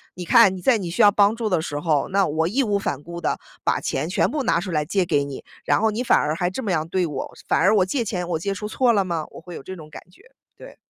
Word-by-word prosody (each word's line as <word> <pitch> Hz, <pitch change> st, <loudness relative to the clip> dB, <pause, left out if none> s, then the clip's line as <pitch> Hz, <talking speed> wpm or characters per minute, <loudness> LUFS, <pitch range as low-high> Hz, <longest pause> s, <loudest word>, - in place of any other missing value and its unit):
你 180 Hz, -, -6 dB
看 225 Hz, -3 st, +6 dB
你 180 Hz, -, -8 dB
在 240 Hz, +3 st, +3 dB
你 180 Hz, -4 st, -4 dB
需 180 Hz, -, 0 dB
要 205 Hz, -1 st, +7 dB
帮 205 Hz, +1 st, +3 dB
助 230 Hz, -1 st, -3 dB
的 175 Hz, -4 st, +1 dB
时 145 Hz, -2 st, -4 dB
候， 150 Hz, -3 st, +1 dB
那 195 Hz, 0 st, +2 dB
我 160 Hz, +1 st, 0 dB
义 255 Hz, +10 st, +1 dB
无 205 Hz, -4 st, 0 dB
反 145 Hz, -7 st, -3 dB
顾 170 Hz, +1 st, -7 dB
地 -, -, -1 dB, 0.3 s
把 -, -, +1 dB
钱 -, -, -2 dB
全 -, -, +1 dB
部 295 Hz, -3 st, -2 dB
拿 170 Hz, -, +2 dB
出 185 Hz, -2 st, -5 dB
来 150 Hz, -2 st, 0 dB
借 185 Hz, +2 st, 0 dB
给 145 Hz, -4 st, +1 dB
你， 140 Hz, -1 st, -8 dB, 0.2 s
然 -, -, +2 dB
后 220 Hz, 0 st, +2 dB
你 220 Hz, +3 st, -3 dB
反 -, -, +4 dB
而 150 Hz, +1 st, 0 dB
还 175 Hz, +1 st, 0 dB
这 225 Hz, +8 st, -5 dB
么 205 Hz, -, -1 dB
样 160 Hz, -1 st, 0 dB
对 180 Hz, +1 st, 0 dB
我， 145 Hz, -4 st, -5 dB
反 -, -, +2 dB
而 210 Hz, +3 st, +4 dB
我 190 Hz, -3 st, +4 dB
借 235 Hz, +6 st, -1 dB
钱， 180 Hz, -4 st, -3 dB
我 165 Hz, -2 st, -1 dB
借 200 Hz, +3 st, -2 dB
出 210 Hz, +3 st, -5 dB
错 240 Hz, +2 st, +2 dB
了 200 Hz, -2 st, +2 dB
吗？ 170 Hz, -4 st, -3 dB
我 -, -, -11 dB
会 175 Hz, +1 st, -11 dB
有 -, -, -7 dB
这 185 Hz, +6 st, -8 dB
种 155 Hz, -3 st, -12 dB
感 -, -, -9 dB
觉， 185 Hz, -, -22 dB, 0.3 s
对。 -, -, -13 dB
185 Hz, 325 characters per minute, -22 LUFS, 160-210 Hz, 0.3 s, 要